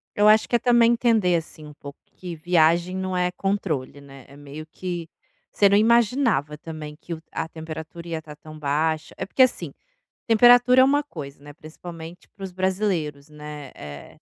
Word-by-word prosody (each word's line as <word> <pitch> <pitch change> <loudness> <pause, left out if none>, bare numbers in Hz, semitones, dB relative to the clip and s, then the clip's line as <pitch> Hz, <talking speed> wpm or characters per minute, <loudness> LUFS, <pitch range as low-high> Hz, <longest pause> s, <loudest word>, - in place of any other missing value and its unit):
Eu 210 +1 +4
acho 215 +1 +5
que 240 - +1
é - - -11
também 235 -1 +4
entender, 225 -7 +2
assim, 155 -1 -5
um 150 - -12
pouco 140 -1 -11 0.2
que 175 -2 -7
viagem 170 +2 +2
não 185 -1 -3
é 180 0 0
controle, 165 -9 -3
né, 135 -2 -14
é 140 - -16
meio 145 +2 -9
que 175 -1 -6 0.4
você 200 - +4
não 200 - +4
imaginava 225 - +2
também 155 -1 -8
que 170 - -7
o 160 - -13
a - - -3
temperatura 160 +1 -9
ia 165 -1 -3
estar 150 -1 -12
tão 155 +1 -13
baixa, 155 +2 -1
é 190 - -4
porque 260 - 0
assim, 255 - +2 0.5
temperatura 245 +2 +6
é - - +7
uma 285 +2 +3
coisa, 140 - -10
né, 145 0 -11
principalmente 165 +2 -11
para 195 - -13
os 190 - -6
brasileiros, 185 -7 -2
né, 150 -2 -9
eh, 70 -1 -11
170 Hz, 185 wpm, -23 LUFS, 150-205 Hz, 0.5 s, é